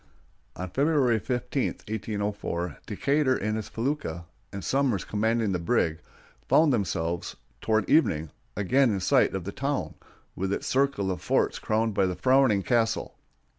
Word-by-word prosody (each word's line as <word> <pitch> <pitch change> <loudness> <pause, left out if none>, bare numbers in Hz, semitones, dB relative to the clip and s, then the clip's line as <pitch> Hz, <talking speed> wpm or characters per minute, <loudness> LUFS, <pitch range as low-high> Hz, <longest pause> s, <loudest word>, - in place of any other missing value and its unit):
On 90 - -5
February 135 - +2
15, 125 +3 -2 0.2
1804, 100 -5 -3
Decatur 140 -2 +1
in 110 +2 -2
his 110 -1 -4
felucca, 115 - -3 0.3
and 100 -2 -6
Somers 135 -8 +1
commanding 110 0 0
the 90 - -1
brig, 85 -4 +1 0.5
found 155 -3 +5
themselves, 85 -6 -2 0.3
toward 110 -3 +1
evening, 80 - +2 0.2
again 125 +7 +3
in 100 -3 0
sight 95 - +3
of 95 - -3
the 100 - -5
town, 140 +5 -2 0.4
with 95 +1 -2
its - - -2
circle 135 -8 +1
of 90 - -4
forts - - +1
crowned 110 0 0
by 100 -1 +2
the 90 - -2
frowning 130 0 +3
castle. 115 -1 0
110 Hz, 145 wpm, -27 LUFS, 95-130 Hz, 0.5 s, found